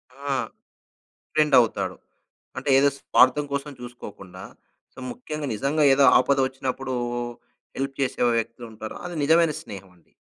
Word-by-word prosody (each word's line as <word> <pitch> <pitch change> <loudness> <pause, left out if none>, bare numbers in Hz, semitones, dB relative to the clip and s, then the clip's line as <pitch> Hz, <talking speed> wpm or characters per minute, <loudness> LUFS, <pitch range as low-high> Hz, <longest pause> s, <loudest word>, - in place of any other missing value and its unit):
ఆ! 140 0 -3 1.0
ఫ్రెండ్ 155 -1 +2
అవుతాడు. 100 -5 -1 0.6
అంటే - - -5
ఏదో 140 +1 +5
స్వార్థం 130 +3 +3
కోసం 140 +1 -3
చూసుకోకుండా, 100 -6 -10 0.5
అంటె - - -13
ముఖ్యంగా 155 -11 -6
నిజంగా 140 +8 0
ఏదో 140 +1 +4
ఆపద 140 0 +2
వచ్చినప్పుడు 130 0 -4 0.8
హెల్ప్ 135 0 -3
చేసే 130 - -1 0.2
వ్యక్తి 115 +1 -5
ఉంటారు. 110 0 -8
అది 175 0 -6
నిజమైన 165 +1 +4
స్నేహం 95 -2 -10
అండి. 85 - -30
135 Hz, 130 wpm, -24 LUFS, 115-145 Hz, 1.0 s, ఏదో